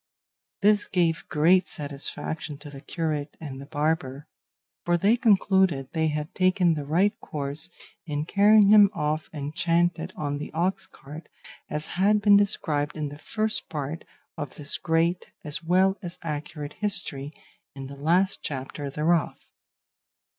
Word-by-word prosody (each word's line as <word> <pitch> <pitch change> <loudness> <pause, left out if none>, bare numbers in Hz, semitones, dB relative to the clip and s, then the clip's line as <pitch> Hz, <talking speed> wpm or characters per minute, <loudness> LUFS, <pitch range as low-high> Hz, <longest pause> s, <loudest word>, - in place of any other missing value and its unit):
This 205 0 +4
gave 170 -3 0
great 175 +5 +4
satisfaction 150 +1 -5
to 145 0 -11
the 135 -1 -10
curate 155 -3 -3
and 135 -4 -7
the 140 - -10
barber, 145 -2 -1 0.6
for 175 0 +2
they 200 +6 +4
concluded 190 - +3
they 160 -1 +1
had 150 0 -3
taken 185 -2 +3
the 150 -2 -4
right 180 +8 +2
course 150 +3 -4 0.4
in 150 0 -2
carrying 205 +2 +5
him 205 -1 +8
off 155 -1 -1
enchanted 165 +3 0
on 145 -1 -3
the 150 - -6
ox 185 +3 0
cart, 150 +3 -12 0.4
as 150 +1 -3 0.2
has 205 +2 +5
been 205 -1 +5
described 155 -7 +1
in 150 -2 -2
the 145 +1 -11
First 215 +5 -2
Part 150 +1 -4 0.4
of 145 -3 -5
this 145 -1 -2
great 170 +2 +1 0.2
as 150 +2 -4
well 185 +3 +3
as 175 -3 -6
accurate 150 -1 -5
history, 155 -9 -1 0.4
in 135 -1 -7
the 140 +1 -8
last 180 +5 +2
chapter 140 +1 -5
thereof. 155 +3 0
160 Hz, 145 wpm, -26 LUFS, 145-185 Hz, 0.6 s, him